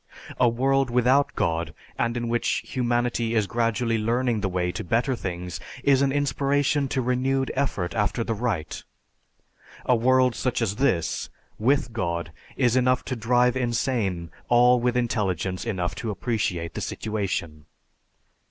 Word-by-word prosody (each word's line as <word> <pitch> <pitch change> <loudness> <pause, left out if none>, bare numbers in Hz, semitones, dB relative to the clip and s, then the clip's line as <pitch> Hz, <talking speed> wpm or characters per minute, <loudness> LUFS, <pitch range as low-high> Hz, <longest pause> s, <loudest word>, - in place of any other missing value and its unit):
A 120 - +5
world 135 +2 +1
without 125 +4 +3
God, 80 0 -1 0.2
and 115 +1 -1
in 120 0 -2
which 120 0 0
humanity 120 -2 0
is 110 -2 +3
gradually 115 0 0
learning 115 0 0
the 100 - 0
way 90 -1 -1
to - - -5
better 120 +7 +1
things, 90 -3 -5 0.2
is 140 -1 +4
an 140 -1 +2
inspiration 145 +1 +1
to 130 0 -1
renewed 130 +2 0
effort 120 -10 -1
after 110 +2 0
the 115 - -2
right. 100 -9 -3 1.0
A 125 - +4
world 130 +1 +3
such 125 0 -1
as 105 -3 -1
this, 120 -12 0 0.3
with 125 +1 +1
God, 85 -5 -2 0.3
is 120 -1 +3
enough 125 0 +2
to 130 - -3
drive 125 +2 +2
insane 115 - -1 0.2
all 125 +1 +5
with 125 +1 +1
intelligence 95 -6 -1
enough 95 -6 -2
to 115 - -5
appreciate 95 -6 -2
the - - -5
situation." 85 -8 -3
120 Hz, 145 wpm, -25 LUFS, 100-125 Hz, 1.0 s, A